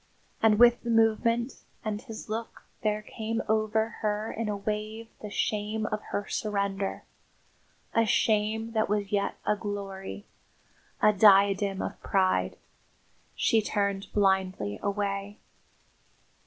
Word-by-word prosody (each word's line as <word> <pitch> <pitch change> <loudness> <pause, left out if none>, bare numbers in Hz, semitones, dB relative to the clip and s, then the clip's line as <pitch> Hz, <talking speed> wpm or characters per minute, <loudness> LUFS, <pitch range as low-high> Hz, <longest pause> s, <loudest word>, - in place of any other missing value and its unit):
And 220 -1 +5
with 240 +1 +6
the 235 - -5
movement 230 +2 +2 0.2
and 210 -1 -2
his 225 -4 -9
look 225 +1 -5 0.2
there 215 -2 0
came 225 +1 -3
over 220 0 +1
her 215 0 -1
in 225 -1 -3
a 205 - -1
wave 215 +2 -4
the 210 - -6
shame 210 +1 -1
of 215 0 -2
her 205 - -2
surrender, 200 -2 -2 0.9
a 230 -1 +3
shame 220 +2 +1
that 220 -2 +1
was 205 -1 -1
yet 200 -1 0
a 210 - +2
glory, 200 -1 -6 0.8
a 210 - +6
diadem 195 -1 +5
of - - -6
pride. 190 -1 +1 0.8
She 225 - +3
turned 200 -2 -1
blindly 190 - +1
away. 200 0 -2
210 Hz, 125 wpm, -28 LUFS, 200-220 Hz, 0.9 s, with